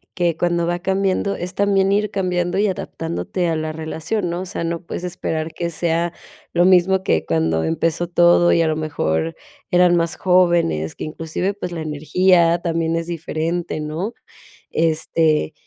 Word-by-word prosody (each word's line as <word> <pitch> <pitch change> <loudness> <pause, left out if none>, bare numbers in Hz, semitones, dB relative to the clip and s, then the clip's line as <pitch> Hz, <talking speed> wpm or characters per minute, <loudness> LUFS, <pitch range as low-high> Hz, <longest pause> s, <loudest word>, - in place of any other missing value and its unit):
que 175 -3 +1
cuando 170 0 0
va 175 +1 -1
cambiando, 195 +1 0
es 180 +2 -5
también 195 0 +2
ir 210 +1 +1
cambiando 180 -2 -1
y 210 - +3
adaptándote 175 -1 -3
a 165 - 0
la 155 0 -2
relación, 160 +5 -3
¿no? 175 - -3
O 185 - -5
sea, 170 - -4
no 170 0 -2
puedes 175 - -6
esperar 165 -3 -3
que 170 -1 -3
sea 170 +1 0 0.4
lo 175 +1 +4
mismo 190 +1 +4
que 80 - +1
cuando 80 0 +1
empezó 165 - 0
todo 175 0 +4
y 170 - +4
a - - +1
lo 155 - 0
mejor 80 - -1 0.3
eran 180 0 +4
más 165 -1 0
jóvenes. 170 - +2
Que - - -6
inclusive, 165 +5 -3
pues, 180 -3 -6
la 165 -2 -4
energía 165 +3 +3
también 165 -1 -1
es 165 - -2
diferente, 165 0 -3
¿no? 160 +9 -4 0.6
Este, 160 - +1
170 Hz, 170 wpm, -20 LUFS, 160-180 Hz, 0.6 s, lo